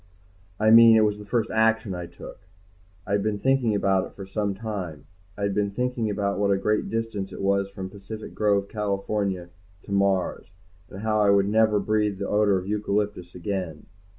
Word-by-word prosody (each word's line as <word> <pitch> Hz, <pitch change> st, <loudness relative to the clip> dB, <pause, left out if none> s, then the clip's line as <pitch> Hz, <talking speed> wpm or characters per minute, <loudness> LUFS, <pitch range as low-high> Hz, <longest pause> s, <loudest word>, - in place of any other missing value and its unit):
I 110 Hz, +1 st, +4 dB
mean 115 Hz, 0 st, +9 dB
it 110 Hz, -, +5 dB
was 105 Hz, 0 st, -1 dB
the 105 Hz, -, -11 dB
first 115 Hz, 0 st, 0 dB
action 110 Hz, -2 st, +2 dB
I 90 Hz, -1 st, -5 dB
took. 85 Hz, 0 st, -11 dB, 0.7 s
I 100 Hz, -, -7 dB
had 100 Hz, 0 st, +2 dB
been 105 Hz, 0 st, -1 dB
thinking 130 Hz, -2 st, +2 dB
about 95 Hz, -2 st, +2 dB
it -, -, -19 dB
for 100 Hz, -, -8 dB
some 100 Hz, 0 st, -2 dB
time. 95 Hz, -8 st, -6 dB, 0.3 s
I 100 Hz, -, -4 dB
had 100 Hz, -1 st, 0 dB
been 105 Hz, 0 st, 0 dB
thinking 120 Hz, +1 st, -2 dB
about 100 Hz, -1 st, -1 dB
what 100 Hz, -1 st, +2 dB
a 100 Hz, -, +3 dB
great 105 Hz, +2 st, 0 dB
distance 110 Hz, -4 st, -3 dB
it -, -, -8 dB
was 100 Hz, 0 st, +1 dB
from 95 Hz, -1 st, -6 dB
Pacific 105 Hz, +2 st, -9 dB
Grove, 100 Hz, -2 st, +1 dB
California 100 Hz, -3 st, -2 dB, 0.3 s
to -, -, -11 dB
Mars, 100 Hz, -2 st, 0 dB, 0.4 s
and 95 Hz, -, -9 dB
how 110 Hz, -1 st, +1 dB
I 105 Hz, -, +4 dB
would 100 Hz, -1 st, +4 dB
never 110 Hz, 0 st, +3 dB
breathe 105 Hz, -1 st, 0 dB
the -, -, -3 dB
odor 105 Hz, -2 st, +3 dB
of 90 Hz, -, -5 dB
eucalyptus 105 Hz, -3 st, -2 dB
again. 90 Hz, -4 st, -4 dB
100 Hz, 195 wpm, -25 LUFS, 100-110 Hz, 0.7 s, mean